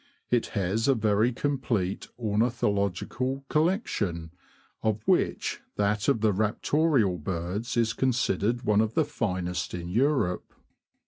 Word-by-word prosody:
It 120 -2 +2
has 100 +5 0
a 135 - +5
very 110 +1 +2
complete 120 -8 -1
ornithological 115 +3 -1
collection, 110 - 0 0.5
of 110 -1 0
which - - +1
that 105 +1 0
of 135 -6 +2
the 110 -2 +3
Raptorial 110 - +1
birds 95 +7 -3
is 115 -1 +2
considered 120 -2 0
one 105 0 +3
of 110 0 -1
the 160 - +3
finest 90 -11 -2
in 85 -1 -5
Europe. 120 -4 0
110 Hz, 120 wpm, -27 LUFS, 95-125 Hz, 0.5 s, a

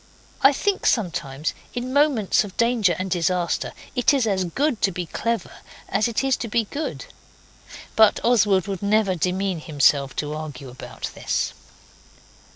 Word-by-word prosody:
I 275 - +7
think 390 +7 0
sometimes, 155 - -1 0.2
in 250 +1 -3
moments 280 -10 +3
of 200 -3 -10
danger 230 -7 +3
and 185 0 -4
disaster, 175 0 0 0.2
it 250 +3 +3
is 260 -4 +2
as 190 -4 0
good 260 - -1
to 195 - +3
be 180 0 -4
clever 230 +5 -3 0.3
as 200 +3 +2
it 235 +2 -1
is 270 -1 +2
to 235 - -4
be 230 +1 +1
good. 290 +9 -5 0.9
But 220 -1 +5
Oswald 205 -6 +3
would 195 -2 -4
never 205 -1 +2
demean 185 +1 -1
himself 140 -3 +2
to 150 0 -3
argue 145 -4 -7
about 125 - -7
this. - - -2
200 Hz, 155 wpm, -23 LUFS, 170-235 Hz, 0.9 s, I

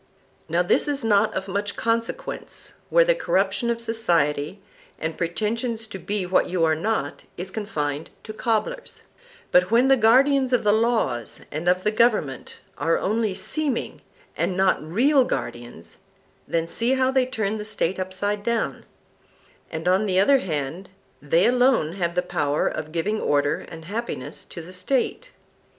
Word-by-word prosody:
Now 170 +2 +2
this 175 - +2
is 285 -3 -1
not 215 -1 +3
of 190 +1 -3
much 200 +2 -2
consequence 230 - -3 0.2
where - - +5
the - - +4
corruption 200 - 0
of 235 -1 0
society, 175 -8 0 0.4
and 160 0 -3
pretension 220 +7 -1
to 220 -3 -8
be 200 +2 -2
what 180 +1 +2
you 175 -2 0
are 160 - +3
not, 160 -3 -2
is 185 +2 -5
confined 155 -9 -3
to 215 - -7
cobblers; 235 - -2 0.5
but 180 0 +4
when 240 +4 +4
the 270 - +7
guardians 260 +3 +4
of 245 - +3
the 210 - +4
laws 220 - 0
and 160 +4 -1
of 180 +1 +2
the 210 - +2
government 215 - +1 0.2
are 165 +4 +2
only 215 -1 0
seeming 295 -1 -2 0.3
and 185 - -1
not 190 -1 +3
real 250 - +3
guardians, 120 - -5 0.5
then 165 -1 0
see 235 +9 0
how 260 0 +2
they 260 -1 +2
turn 220 -4 -2
the - - -4
State 190 -4 -2
upside 195 +2 -2
down; 230 +2 -2 0.8
and 160 +2 -5
on 190 +4 +3
the 185 -1 +2
other 270 +8 +5
hand 160 - -4 0.3
they 165 +5 +3
alone 245 - +3
have 170 -2 -2
the 180 - +1
power 150 -5 0
of 155 0 -4
giving 200 +7 -1
order 145 0 +1
and 160 -1 -10
happiness 170 - -5
to 170 - -9
the 180 +3 -11
State. 260 - -1
200 Hz, 160 wpm, -24 LUFS, 165-230 Hz, 0.8 s, the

